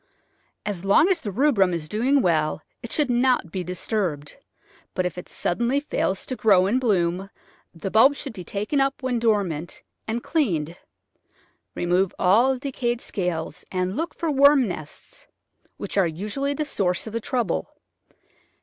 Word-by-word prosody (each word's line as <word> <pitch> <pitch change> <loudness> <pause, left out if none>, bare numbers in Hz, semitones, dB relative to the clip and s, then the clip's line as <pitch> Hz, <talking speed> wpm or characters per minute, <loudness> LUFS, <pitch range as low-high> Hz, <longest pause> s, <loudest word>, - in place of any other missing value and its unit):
As 200 -4 -4
long 200 - +5
as 360 -4 +1
the 215 - -4
rubrum 200 -5 +2
is 155 -2 -5
doing 255 - +2
well 155 -3 +1 0.2
it 235 - -8
should 290 -5 +1
not 245 -7 +2
be 185 0 -3
disturbed, 180 -4 -3 0.6
but 185 - 0
if 180 - -2
it 180 - -8
suddenly 240 +9 0
fails 195 -9 -2
to 255 - -4
grow 195 -6 +4
and 240 +7 +1
bloom 190 -4 +1 0.4
the 175 +3 -6
bulbs 265 +6 +5
should - - -6
be 185 - -8
taken 210 - -1
up 270 0 -1
when 250 -2 0
dormant, 195 -8 -1 0.2
and 230 +2 -2
cleansed. 170 - 0 1.0
Remove 180 +2 +1
all 235 +8 +4
decayed 245 -3 -2
scales 175 -7 -3
and 185 +1 -1
look 330 +5 -3
for 330 -3 -1
worm 280 -2 +5
nests, 155 -5 -9 0.5
which - - -2
are 185 - +4
usually 215 - -3
the 305 - -2
source 180 -10 -1
of 220 - -7
the 230 - -2
trouble. 225 - -1
210 Hz, 160 wpm, -24 LUFS, 180-260 Hz, 1.0 s, long